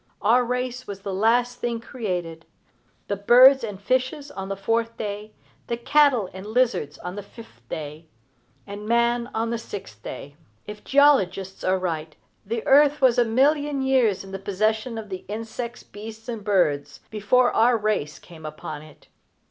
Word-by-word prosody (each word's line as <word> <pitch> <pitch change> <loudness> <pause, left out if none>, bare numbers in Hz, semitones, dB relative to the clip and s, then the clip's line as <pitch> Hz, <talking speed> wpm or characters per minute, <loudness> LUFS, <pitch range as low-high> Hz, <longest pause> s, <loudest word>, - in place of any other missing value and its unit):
Our 235 +4 +4
race 250 +1 -3
was 200 -1 -7
the 195 -1 -4
last 240 +5 +2
thing 235 -1 -2
created, 180 -9 -5 0.6
the 200 - -1
birds 250 +6 +7
and 205 -4 -5
fishes 260 +6 -1
on 195 -6 -6
the 195 - -2
fourth 230 +3 -1
day, 210 0 -5 0.3
the 235 - -2
cattle 265 -4 +3
and 190 0 -8
lizards 220 - 0
on 180 +2 -7
the 205 - -5
fifth 200 - -15
day, 155 +1 -6 0.6
and 205 +1 -8
man 235 +1 +2
on 225 +1 -1
the 235 - -2
sixth 190 - -9
day. 140 +5 -8 0.3
If 210 0 -9
geologists 195 -10 +3
are 185 +1 +2
right, 165 -4 -4 0.3
the 225 +2 -4
earth 290 +1 +5
was 255 -2 +4
a 240 - +4
million 285 +5 +2
of 270 - -1
years 245 -8 +2
in 195 - -11
the 195 - -5
possession 215 +4 -1
of 215 -2 -7
the 185 -1 -6
insects, 225 +3 -6
beasts, 220 +2 -10
and 230 -4 -5
birds, 150 -8 0
before 220 +4 +3
our 235 +1 +4
race 210 -9 -1
came 165 -2 -14
upon 155 -1 -7
it. 155 -1 -17
220 Hz, 170 wpm, -24 LUFS, 190-245 Hz, 0.6 s, birds